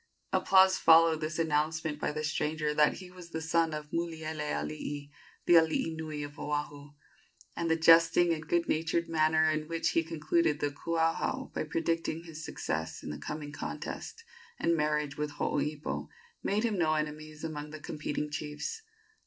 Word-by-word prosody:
Applause 190 Hz, 0 st, +5 dB
followed 165 Hz, -1 st, +6 dB
this 155 Hz, 0 st, -3 dB
announcement 155 Hz, -1 st, 0 dB
by -, -, -1 dB
the 155 Hz, +1 st, -4 dB
stranger 150 Hz, 0 st, -1 dB
that 150 Hz, 0 st, +4 dB
he 185 Hz, -1 st, -10 dB
was 180 Hz, -2 st, -12 dB
the 160 Hz, -, -4 dB
son 165 Hz, 0 st, +1 dB
of 150 Hz, -1 st, -6 dB
Mulielealii, 145 Hz, -, -3 dB, 0.3 s
the -, -, +5 dB
alii 160 Hz, 0 st, +2 dB
nui 155 Hz, -2 st, -5 dB
of 145 Hz, 0 st, -9 dB
Oahu, 145 Hz, -1 st, -4 dB, 0.6 s
and 170 Hz, -1 st, -1 dB
the 160 Hz, -, +4 dB
jesting 165 Hz, +1 st, +6 dB
and 155 Hz, -1 st, -6 dB
good 170 Hz, +1 st, +1 dB
natured 165 Hz, +2 st, 0 dB
manner 160 Hz, -1 st, +3 dB
in 155 Hz, 0 st, -2 dB
which 165 Hz, 0 st, 0 dB
he 165 Hz, -, +2 dB
concluded 160 Hz, -1 st, +1 dB
the 145 Hz, -, 0 dB
kuauhau 165 Hz, +2 st, -1 dB
by -, -, -1 dB
predicting 165 Hz, +1 st, -1 dB
his 160 Hz, -2 st, -9 dB
success 80 Hz, -, -4 dB
in 75 Hz, -, -5 dB
the 75 Hz, -, -6 dB
coming 150 Hz, -, -5 dB
contest, 455 Hz, -, -6 dB, 0.3 s
and 170 Hz, -, +2 dB
marriage 150 Hz, -2 st, 0 dB
with 150 Hz, -1 st, -2 dB
Hooipo, 150 Hz, +1 st, -2 dB, 0.3 s
made 210 Hz, +3 st, 0 dB
him 220 Hz, -5 st, 0 dB
no 155 Hz, -2 st, +3 dB
enemies 155 Hz, 0 st, -4 dB
among 150 Hz, -2 st, -5 dB
the 155 Hz, 0 st, -8 dB
competing 150 Hz, 0 st, -4 dB
chiefs. 150 Hz, -, -4 dB
155 Hz, 160 wpm, -31 LUFS, 150-165 Hz, 0.6 s, followed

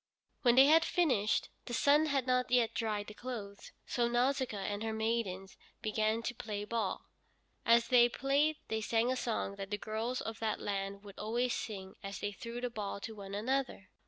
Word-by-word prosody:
When 245 Hz, -3 st, +5 dB
they 265 Hz, +1 st, +9 dB
had 320 Hz, +3 st, +6 dB
finished, 260 Hz, -, +1 dB, 0.2 s
the 240 Hz, -, -3 dB
sun 295 Hz, +5 st, +4 dB
had 275 Hz, -4 st, +1 dB
not 250 Hz, -1 st, +1 dB
yet 245 Hz, -2 st, +3 dB
dried 210 Hz, -2 st, -1 dB
the 210 Hz, -, -9 dB
clothes, 210 Hz, -4 st, -7 dB
so 240 Hz, -1 st, +1 dB
Nausicaa 250 Hz, -1 st, +1 dB
and 205 Hz, +1 st, -3 dB
her 220 Hz, 0 st, -2 dB
maidens 220 Hz, -4 st, -2 dB, 0.3 s
began 215 Hz, +1 st, +1 dB
to 240 Hz, -, -2 dB
play 210 Hz, -3 st, -5 dB
ball. 230 Hz, +1 st, -2 dB, 0.6 s
As 235 Hz, 0 st, +5 dB
they 240 Hz, -2 st, +6 dB
played 280 Hz, +5 st, +2 dB
they 220 Hz, 0 st, -1 dB
sang 230 Hz, +3 st, +2 dB
a -, -, +1 dB
song 220 Hz, -5 st, -2 dB
that 195 Hz, -1 st, -5 dB
the 205 Hz, -, -1 dB
girls 220 Hz, +4 st, -2 dB
of 225 Hz, 0 st, -5 dB
that 220 Hz, -1 st, -1 dB
land 200 Hz, 0 st, -3 dB
would 200 Hz, -1 st, -11 dB
always 235 Hz, +3 st, 0 dB
sing 190 Hz, -4 st, -5 dB
as 195 Hz, 0 st, -6 dB
they 205 Hz, -, -2 dB
threw 230 Hz, +4 st, -6 dB
the 245 Hz, -1 st, -2 dB
ball 205 Hz, -3 st, -4 dB
to 225 Hz, -, -6 dB
one 200 Hz, -2 st, -7 dB
another. 250 Hz, -2 st, -1 dB
225 Hz, 190 wpm, -33 LUFS, 205-250 Hz, 0.6 s, they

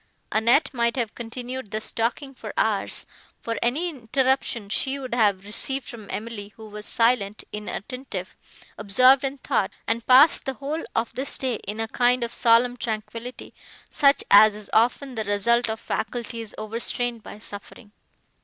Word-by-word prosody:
Annette 235 Hz, +8 st, +3 dB
might 235 Hz, -1 st, +1 dB
have 235 Hz, -4 st, -2 dB
continued 245 Hz, +1 st, -6 dB
thus 215 Hz, +1 st, -3 dB
talking 245 Hz, +5 st, -2 dB
for -, -, -9 dB
hours -, -, +1 dB, 0.3 s
for 230 Hz, -1 st, -3 dB
any 280 Hz, +9 st, +1 dB
interruption 260 Hz, -5 st, 0 dB
she 265 Hz, +6 st, -1 dB
would 260 Hz, -3 st, -6 dB
have 205 Hz, -5 st, +2 dB
received 265 Hz, +6 st, -3 dB
from 220 Hz, -4 st, -9 dB
Emily, 215 Hz, -2 st, -5 dB
who 220 Hz, -1 st, -11 dB
was 210 Hz, 0 st, -6 dB
silent, 225 Hz, -3 st, +1 dB
inattentive, 210 Hz, -1 st, -6 dB, 0.4 s
absorbed 255 Hz, +7 st, +5 dB
in 275 Hz, +1 st, -2 dB
thought, 235 Hz, -7 st, 0 dB, 0.2 s
and 225 Hz, +1 st, -1 dB
passed 265 Hz, +5 st, +7 dB
the 270 Hz, -, -2 dB
whole 295 Hz, +5 st, -4 dB
of 225 Hz, 0 st, 0 dB
this 265 Hz, +2 st, -4 dB
day 255 Hz, -4 st, -1 dB
in 210 Hz, +2 st, -4 dB
a 225 Hz, -, -1 dB
kind 245 Hz, +2 st, +2 dB
of 235 Hz, -, -4 dB
solemn 245 Hz, +1 st, +4 dB
tranquillity, 230 Hz, +2 st, -5 dB, 0.4 s
such 280 Hz, -1 st, +4 dB
as 210 Hz, +1 st, +8 dB
is 210 Hz, -1 st, -8 dB
often 250 Hz, +4 st, +2 dB
the 220 Hz, -2 st, -2 dB
result 225 Hz, +4 st, +2 dB
of 220 Hz, 0 st, -3 dB
faculties 230 Hz, -1 st, -4 dB
overstrained 230 Hz, +2 st, -2 dB
by 205 Hz, -, -10 dB
suffering. 205 Hz, +1 st, -9 dB
235 Hz, 155 wpm, -24 LUFS, 215-255 Hz, 0.4 s, as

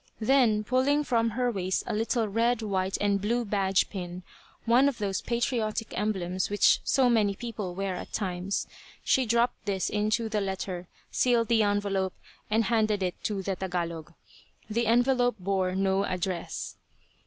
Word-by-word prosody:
Then, 225 Hz, -3 st, +3 dB
pulling 260 Hz, +6 st, +2 dB
from 230 Hz, -4 st, +1 dB
her 250 Hz, -1 st, +1 dB
waist 190 Hz, -3 st, -1 dB
a 235 Hz, -, -3 dB
little 225 Hz, +1 st, 0 dB
red, 230 Hz, +2 st, +1 dB
white 190 Hz, -2 st, -1 dB
and 200 Hz, -1 st, +1 dB
blue 235 Hz, +4 st, 0 dB
badge 195 Hz, -2 st, +1 dB
pin 180 Hz, -2 st, -6 dB, 0.4 s
one 245 Hz, +4 st, +5 dB
of 265 Hz, -, -6 dB
those 195 Hz, -3 st, -2 dB
patriotic 235 Hz, -2 st, -1 dB
emblems 190 Hz, -3 st, -1 dB
which 205 Hz, 0 st, +4 dB
so 265 Hz, -2 st, +3 dB
many 215 Hz, -4 st, +2 dB
people 210 Hz, -6 st, -5 dB
wear 195 Hz, -1 st, -2 dB
at -, -, -7 dB
times 185 Hz, -1 st, -2 dB, 0.4 s
she 260 Hz, -2 st, +2 dB
dropped 235 Hz, +1 st, +1 dB
this 195 Hz, -2 st, -1 dB
into 215 Hz, +2 st, 0 dB
the 215 Hz, -1 st, -1 dB
letter, 190 Hz, -2 st, -4 dB, 0.2 s
sealed 235 Hz, -3 st, +2 dB
the 230 Hz, -1 st, +4 dB
envelope, 200 Hz, -2 st, 0 dB, 0.3 s
and 220 Hz, +2 st, +3 dB
handed 215 Hz, -2 st, +1 dB
it 180 Hz, -1 st, -3 dB
to 200 Hz, -3 st, -1 dB
the 195 Hz, 0 st, -2 dB
Tagalog. 170 Hz, -3 st, -4 dB, 0.5 s
The 230 Hz, +2 st, 0 dB
envelope 245 Hz, +1 st, +3 dB
bore 185 Hz, -1 st, 0 dB
no 195 Hz, 0 st, +1 dB
address. 185 Hz, -2 st, -3 dB
210 Hz, 155 wpm, -28 LUFS, 190-235 Hz, 0.5 s, one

